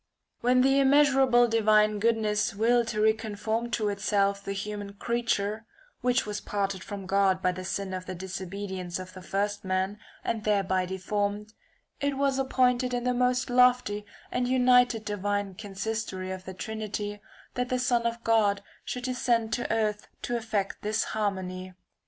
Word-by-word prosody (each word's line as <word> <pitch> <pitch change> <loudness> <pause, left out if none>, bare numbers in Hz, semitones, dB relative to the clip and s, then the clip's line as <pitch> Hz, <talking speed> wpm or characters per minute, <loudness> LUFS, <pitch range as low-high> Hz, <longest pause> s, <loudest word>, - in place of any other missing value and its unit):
[i. 235 - -5
When 255 0 +5
the 270 +1 +4
immeasurable 270 -3 +5
divine 215 -2 +3
goodness 215 -2 +1
willed 235 +2 +3
to 215 -1 -2
reconform 220 +1 0
to 215 -2 +1
itself 200 0 +1
the - - -4
human 205 0 -5
creature 220 -1 -1 0.3
(which 250 +1 +2
was 210 -1 -4
parted 195 -2 -2
from 200 -1 -7
God 195 -1 +2
by 185 -1 +1
the 185 +1 -6
sin 190 0 -3
of 185 0 -5
the 185 - -4
disobedience 190 0 -5
of 185 0 -8
the 185 - -10
first 205 +2 -2
man, 185 0 0
[20~\ 210 - -14 0.3
and 220 -2 -1
thereby 195 -3 +1
deformed), 205 +3 -2 0.5
it 280 -1 -1
was 275 -1 +1
appointed 250 -1 +2
in 245 - -2
the 250 0 +1
most 250 0 +1
lofty 250 -4 +4 0.3
and 250 0 0
united 250 -3 +4
divine 205 -1 -2
consistory 200 -1 -4
of 185 0 -6
the 190 - -7
Trinity 210 0 -4 0.3
that 250 0 -2
the 255 - +1
Son 245 -2 +2
of 235 0 -4
God 205 -3 +3 0.2
should 250 - -5
descend 240 -3 0
to 240 - -1
earth 215 -2 0 0.2
to 240 - -1
effect 220 -4 -2
this 215 +1 0
harmony. 185 -3 -3
210 Hz, 165 wpm, -28 LUFS, 200-240 Hz, 0.5 s, When